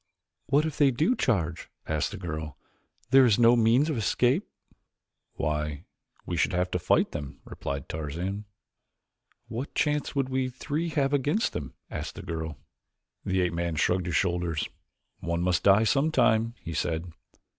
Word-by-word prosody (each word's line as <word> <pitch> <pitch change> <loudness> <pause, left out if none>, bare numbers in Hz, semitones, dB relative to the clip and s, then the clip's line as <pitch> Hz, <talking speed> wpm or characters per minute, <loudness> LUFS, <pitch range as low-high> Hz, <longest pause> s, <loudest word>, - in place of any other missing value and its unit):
"What 145 +3 +3
if 155 -3 -4
they 145 -2 +6
do 155 - +2
charge?" 85 - -1 0.2
asked 75 -1 0
the 105 - -7
girl; 80 -6 -5 0.5
"there 135 0 +8
is 115 -5 +4
no 120 0 +6
means 120 +5 +4
of 150 -7 -1
escape." 125 - +2 0.9
"Why, 75 -1 -2 0.4
we 85 - -3
should 90 - +1
have 90 +1 0
to - - 0
fight - - +2
them," 70 -2 -6
replied 70 -1 -5
Tarzan. 85 +7 -4 1.0
"What 125 +5 -5
chance 150 -1 0
would 135 -2 +1
we 130 0 0
three 150 +6 -3
have 140 -3 0
against 145 - +1
them?" 70 -4 -5 0.2
asked - - -5
the - - -8
girl. 80 -3 -4 0.7
The 95 -1 +1
ape 90 -1 0
man 85 -1 -2
shrugged 90 +3 +1
his 85 - -1
shoulders. 85 -3 0 0.5
"One 85 0 -2
must 90 -1 +2
die 100 +2 +5
sometime," 120 -4 +2
he 85 -1 -6
said. 85 +1 -2
95 Hz, 155 wpm, -27 LUFS, 85-130 Hz, 1.0 s, there